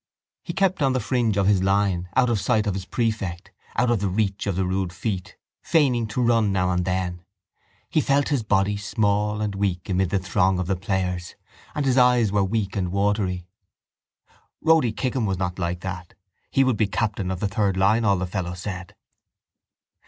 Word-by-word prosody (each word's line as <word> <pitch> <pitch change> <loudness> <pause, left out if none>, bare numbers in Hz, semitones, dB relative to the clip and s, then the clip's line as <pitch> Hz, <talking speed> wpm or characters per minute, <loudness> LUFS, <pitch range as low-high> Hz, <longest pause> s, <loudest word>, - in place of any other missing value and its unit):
He 170 - -6
kept 190 -2 +1
on 135 -2 +3
the 130 - +1
fringe 115 -2 0
of 100 - +2
his 100 -2 +3
line, 95 -2 +1
out 130 -1 +4
of 110 - +1
sight 110 +2 +1
of 100 - 0
his 95 -1 -5
prefect, 105 -7 -2 0.2
out 120 0 +2
of 115 - +2
the 100 0 0
reach 100 +1 -1
of 100 - 0
the 95 0 0
rude 95 -1 -1
feet, 95 +1 -4 0.2
feigning 125 -8 +2
to 115 +4 -1
run 115 -3 +3
now 90 -1 +1
and 90 -1 0
then. 90 -1 -2 0.6
He 155 - +1
felt 140 0 +2
his 140 -4 +1
body 100 -1 +1
small 105 0 0
and 105 -1 -1
weak 95 -3 -2
amid 95 -1 +1
the 100 - +1
throng 95 0 +1
of 90 - -1
the 95 +2 0
players 90 -2 -2 0.4
and 145 - -1
his 130 -1 +3
eyes 125 -4 +4
were 100 -1 +2
weak 100 -1 -1
and 90 -3 -1
watery. 100 -2 0 1.1
Rody 160 -7 +4
Kickham 125 0 -1
was 95 -1 -1
not 90 0 -3
like 85 0 -2
that: 90 -1 -6 0.3
he 135 - +3
would 130 -4 +1
be 110 - +2
captain 100 -2 -2
of 95 -1 -3
the 105 - 0
third 100 -1 0
line 105 +5 +3
all 100 -3 +3
the 95 - -2
fellows 90 -1 -4
said. 90 -2 -6
100 Hz, 195 wpm, -24 LUFS, 95-115 Hz, 1.1 s, out